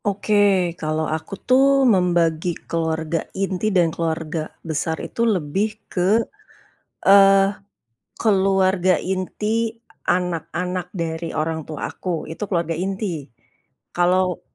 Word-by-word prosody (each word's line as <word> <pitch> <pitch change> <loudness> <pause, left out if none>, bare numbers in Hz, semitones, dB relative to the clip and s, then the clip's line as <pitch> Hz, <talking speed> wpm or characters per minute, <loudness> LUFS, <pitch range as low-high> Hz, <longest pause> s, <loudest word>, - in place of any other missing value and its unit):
Oke, 205 +1 -1 0.5
kalau 155 0 -1
aku 155 +4 -4
tuh 270 +1 +5
membagi 175 -2 +1
keluarga 160 0 -1 0.2
inti 195 +1 -1
dan 175 -5 +2
keluarga 160 -1 -3 0.2
besar 160 +1 -1
itu - - -5
lebih 180 +5 0 0.3
ke, 185 +4 +3 0.9
eee, 195 0 +6 0.7
keluarga 190 -3 +3
inti 210 +6 -2 0.3
anak-anak 180 0 -1
dari 165 -1 -3
orang 160 +1 -1
tua 155 -2 -5
aku 175 -4 -4
itu 160 - -9
keluarga 170 -4 -1
inti, 180 -3 -3 0.7
kalau, 180 0 +2
180 Hz, 105 wpm, -22 LUFS, 160-195 Hz, 0.9 s, eee